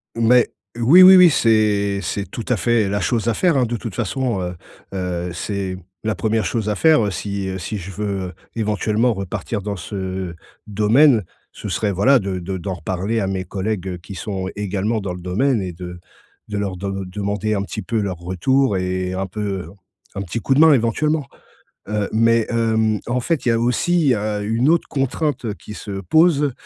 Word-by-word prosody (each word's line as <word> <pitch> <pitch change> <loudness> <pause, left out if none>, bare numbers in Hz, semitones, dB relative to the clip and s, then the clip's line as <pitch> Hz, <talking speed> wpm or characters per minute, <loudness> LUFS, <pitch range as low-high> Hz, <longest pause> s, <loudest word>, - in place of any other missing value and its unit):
Mais 115 +1 +4 0.3
oui, 140 +11 +7
oui, 190 +1 +10
oui. 180 -1 +8
C'est 105 -6 +2
c'est 100 0 -3
tout 115 - -6
à 125 - +2
fait 115 -3 +2
la 100 +1 0
chose 115 +4 0
à 115 - +3
faire 170 - +2
hein, 130 - +3
de 120 +1 -3
toute 110 -4 -7
façon, 120 -1 -1
heu, 90 0 -4 0.4
heu, 90 -2 -3
c'est 95 +1 -3 0.3
la 110 -1 -1
1re 110 -2 0
chose 110 +3 -1
à 105 - 0
faire, 155 -1 +4
heu, 100 - -1
si 100 +2 -4
si 105 - -4
je 95 0 -7
veux 95 -2 -3 0.2
éventuellement 110 +2 +1
repartir 100 +2 -4
dans 105 +1 -4
ce 95 -1 -5 0.3
domaine. 110 +4 +4 0.3
Ce - - -7
serait 105 -2 0
voilà 125 +9 +4
de 95 -3 -3
de 95 +2 -4
d'en 95 +1 -4
reparler 95 +5 -2
à 100 - -1
mes 95 -1 -2
collègues, 95 +1 -3
heu, 90 - -4
qui 95 +3 -10
sont 95 +1 -4
également 105 +2 -1
dans 95 -2 -4
le 90 - -8
domaine 105 +6 +1
et 90 -2 -4
de 90 0 -8 0.5
de 105 - -3
leur 100 -2 -2
de 95 +1 -4
demander 100 +3 -2
un 100 - -1
petit 105 +2 -5
peu 115 -2 -2
leur 95 -4 -2
retour 95 +7 +1
et 90 0 -2
un 95 +1 -2
peu, 95 -3 -4 0.5
un 100 - -3
petit 100 +4 -4
coup 135 - +1
de - - +3
main 160 - +8
éventuellement, 145 +4 +1 0.6
heu, 105 -1 -1
mais, 115 0 +3
hem, 110 -2 +1
en 125 +1 0
fait, 160 +3 -1
il - - +3
y - - +4
a 115 - +2
aussi, 135 +5 +2
heu, 105 -1 -2
une 115 +6 +1
autre 170 0 +3
contrainte, 135 0 -1
heu, 105 - -2
qui 105 - -11
se 100 -2 -6
pose, 150 - +3
105 Hz, 200 wpm, -20 LUFS, 95-115 Hz, 0.6 s, oui